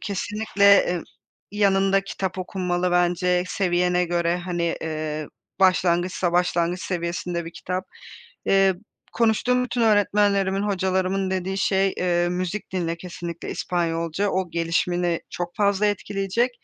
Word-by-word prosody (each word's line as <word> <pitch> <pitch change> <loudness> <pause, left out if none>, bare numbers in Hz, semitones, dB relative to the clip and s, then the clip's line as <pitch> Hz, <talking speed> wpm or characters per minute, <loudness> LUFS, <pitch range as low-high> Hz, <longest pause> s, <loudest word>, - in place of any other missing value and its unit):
kesinlikle 205 0 -2
e 175 -3 +2 0.5
yanında 195 -1 +3
kitap 190 -1 -4
okunmalı 180 -1 -1
bence 180 0 +2
seviyene 180 -1 +1
göre, 170 0 0
hani, 175 -2 -2
eee, 155 -1 -3 0.3
başlangıçsa 180 -1 +2
başlangıç 175 0 +1
seviyesinde 170 -1 -3
bir 165 - -8
kitap. 185 +1 -4 0.6
Eee, 195 -1 +4 0.4
konuştuğum 235 +2 +2
bütün 245 -1 -3
öğretmenlerimin, 205 -2 +2
hocalarımın 190 -1 0
dediği 190 +1 -2
şey, 195 0 +2
eee, 175 -1 +1
"Müzik 185 +3 -3
dinle 170 -2 -1
kesinlikle 170 -1 -7
İspanyolca. 170 +2 -1
O 185 -2 -1
gelişimini 170 +1 0
çok 175 0 -5
fazla 205 0 +2
etkileyecek. 205 +3 0
180 Hz, 115 wpm, -24 LUFS, 175-195 Hz, 0.6 s, Eee